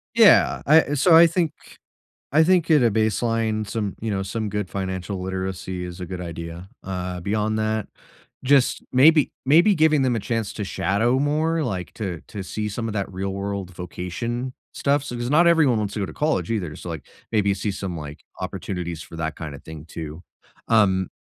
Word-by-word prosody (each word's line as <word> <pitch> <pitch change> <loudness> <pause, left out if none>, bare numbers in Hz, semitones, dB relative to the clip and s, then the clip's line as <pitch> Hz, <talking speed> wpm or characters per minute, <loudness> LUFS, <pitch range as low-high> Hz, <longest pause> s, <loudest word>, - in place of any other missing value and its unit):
Yeah. - - +6
I 155 0 +5
so 160 +4 +5
I 170 +1 +9
think 165 -2 0 0.8
I 155 +3 +5
think 175 -1 +3
at 150 -5 +5
a 115 - +4
baseline, 110 0 0
some 105 -1 -3
you 110 -1 -3
know, 95 -1 -1
some 110 +1 -3
good 105 -2 -3
financial 95 0 -4
literacy 95 -1 -4
is 90 0 -7
a 90 - -4
good 90 0 -6
idea, 85 +2 -7
uh, 90 -1 -4
beyond 110 +2 0
that, 110 -1 -1 0.6
just 135 -1 +3
maybe 150 +3 +5
maybe 170 +9 +6
giving 155 -4 +3
them 125 -2 +1
a - - 0
chance 115 -1 -2
to 105 - -4
shadow 110 +6 +1
more, 155 +3 +1
like, 95 -8 -4
to 90 -7 -4
to 100 -3 -6
see 105 +3 -4
some 115 +3 -4
of 110 - -4
that 100 -2 -3
real 95 +1 -3
world 100 -2 -4
vocation 115 +9 -4 0.2
stuff. 140 0 +1
So 125 -3 -6
s 120 +1 -3
not 170 +4 +5
everyone 150 -9 +4
wants 105 0 -3
to - - -2
go - - 0
to - - -9
college 150 -6 0
either, 90 -9 -2
so 90 - -8
like, 80 -5 -7 0.2
maybe 100 -3 +2
see 100 +1 -2
some 95 -3 -5
like, 75 -1 -8 0.2
opportunities 90 -3 -4
for 85 - -11
that 80 -2 -3
kinda 75 -4 -7
thing 80 0 -10
too. 80 +1 -7 0.5
Um 95 -5 +3
105 Hz, 190 wpm, -23 LUFS, 90-125 Hz, 0.8 s, I